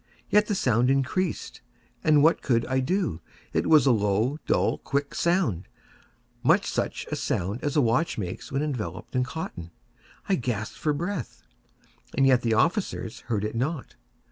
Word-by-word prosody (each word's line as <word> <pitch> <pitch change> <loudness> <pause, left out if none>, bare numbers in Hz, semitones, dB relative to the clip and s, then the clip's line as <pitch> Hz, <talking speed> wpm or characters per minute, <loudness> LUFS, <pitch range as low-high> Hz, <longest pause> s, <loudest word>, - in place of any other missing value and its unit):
Yet 210 0 +4
the 205 - 0
sound 125 - +2
increased—and 150 0 0
what 165 +2 +4
could 115 -3 +1
I 130 0 0
do? 155 - -1 0.3
It - - +1
was 155 -2 +6
a 135 - +5
low, 110 +6 +1
dull, - - +2
quick 140 +1 -2
sound—much 170 - -1
such - - -2
a - - 0
sound 100 +7 -2
as 145 - -1
a 150 - +5
watch 125 +7 +1
makes 90 -4 -5
when 140 +2 0
enveloped 135 -4 -4
in 125 - +3
cotton. 125 - -6 0.6
I 195 - +2
gasped 115 -4 -3
for 150 - +1
breath—and 145 - -5
yet 130 -2 +5
the 115 -2 +1
officers 165 - 0
heard 105 -3 0
it 105 - -3
not. 135 +5 -3
135 Hz, 150 wpm, -26 LUFS, 115-155 Hz, 0.6 s, was